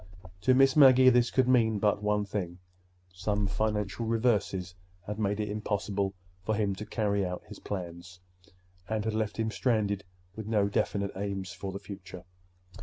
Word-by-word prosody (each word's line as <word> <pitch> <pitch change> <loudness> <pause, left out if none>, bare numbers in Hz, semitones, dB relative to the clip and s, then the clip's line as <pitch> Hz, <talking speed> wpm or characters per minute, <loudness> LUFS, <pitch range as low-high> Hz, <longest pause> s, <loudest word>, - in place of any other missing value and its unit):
To 130 +8 +4
Miss 135 0 +5
Maggie 130 -3 +8
this 120 0 +3
could 130 -1 +2
mean 115 -4 +4
but 105 0 +1
one 105 0 +1
thing: 90 -4 -4 0.6
some 100 +3 -1
financial 105 +2 -1
reverses 110 -6 0 0.3
had 105 +2 -5
made 105 -1 0
it 105 - -1
impossible 100 -2 -2 0.3
for 110 +2 0
him 100 -2 0
to 105 - -7
carry 100 -2 0
out 90 -1 -4
his - - -10
plans, 90 -2 -6 0.7
and 110 -1 -1
had 110 - -1
left 110 -1 -2
him 110 -1 -1
stranded 105 -5 0 0.3
with 110 -1 -6
no 105 -3 +2
definite 100 0 0
aim 100 0 -3
for 95 +1 -6
the 95 - -5
future. 95 -3 -9
105 Hz, 165 wpm, -29 LUFS, 100-110 Hz, 0.7 s, Maggie